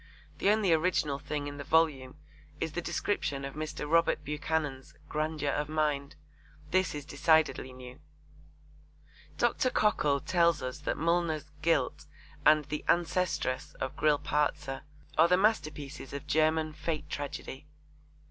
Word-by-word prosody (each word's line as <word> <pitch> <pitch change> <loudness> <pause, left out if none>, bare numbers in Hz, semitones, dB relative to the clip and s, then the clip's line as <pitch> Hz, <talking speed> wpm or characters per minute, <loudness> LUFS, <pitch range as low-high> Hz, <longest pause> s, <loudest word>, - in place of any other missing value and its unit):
The - - +3
only 210 -4 +4
original 155 -4 +1
thing 145 0 -4
in 145 0 -6
the 140 - -5
volume 145 -4 +2 0.4
is 160 - -2
the 175 - -3
description 145 -7 -2
of 135 - -6
Mr. 155 -1 -4
Robert 165 -1 +3
Buchanan's 150 -2 -2
'grandeur 155 -1 -1
of 150 0 -2
mind.' 150 -2 -1 0.6
This 185 -3 +2
is 145 -1 -6
decidedly 150 -2 +2
new. 125 +1 -11 1.4
Dr. 255 - +2
Cockle 150 - +2
tells 170 -2 +2
us 130 +2 -4
that 150 - -2
Mullner's 160 -2 0
Guilt 155 -6 +1 0.4
and 155 -1 +6
The 150 +1 -4
Ancestress 175 -6 0
of 130 - -4
Grillparzer 150 -2 0 0.4
are 165 - +8
the 180 +1 +4
masterpieces 155 - -1
of 140 +1 -5
German 155 +1 +2
fate 155 0 -3
tragedy. 145 0 -6
150 Hz, 130 wpm, -30 LUFS, 140-165 Hz, 1.4 s, are